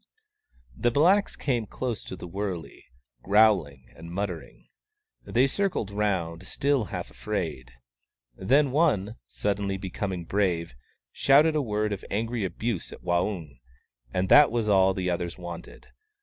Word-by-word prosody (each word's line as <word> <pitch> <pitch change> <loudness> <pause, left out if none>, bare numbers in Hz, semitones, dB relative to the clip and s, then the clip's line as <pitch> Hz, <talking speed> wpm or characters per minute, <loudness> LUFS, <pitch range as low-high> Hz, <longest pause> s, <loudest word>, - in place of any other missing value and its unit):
The 120 - +1
blacks 175 - +3
came 120 -6 -1
close 120 -2 -4
to - - -6
the 90 - -9
wurley, 95 -2 -5 0.4
growling 95 - +3
and 85 - -10
muttering. 90 -3 -5 0.6
They 125 +3 +3
circled 135 - -1
round, 95 -4 -1
still 140 -5 +1
half - - -6
afraid. 80 -12 -4 0.6
Then 135 +8 +3
one, 120 - +1
suddenly 100 -1 -2
becoming 95 -1 -4
brave, 90 -6 0 0.4
shouted 150 +3 +4
a 150 - +2
word 105 -3 -1
of 100 - -6
angry 115 +2 -2
abuse 95 +2 -3
at - - -12
Waung; 85 - -1 0.5
and 90 +6 0
that 145 0 +8
was 115 -2 -1
all 95 -2 +4
the 90 -1 -1
others 85 0 -3
wanted. 85 -2 -9
100 Hz, 135 wpm, -27 LUFS, 90-120 Hz, 0.6 s, that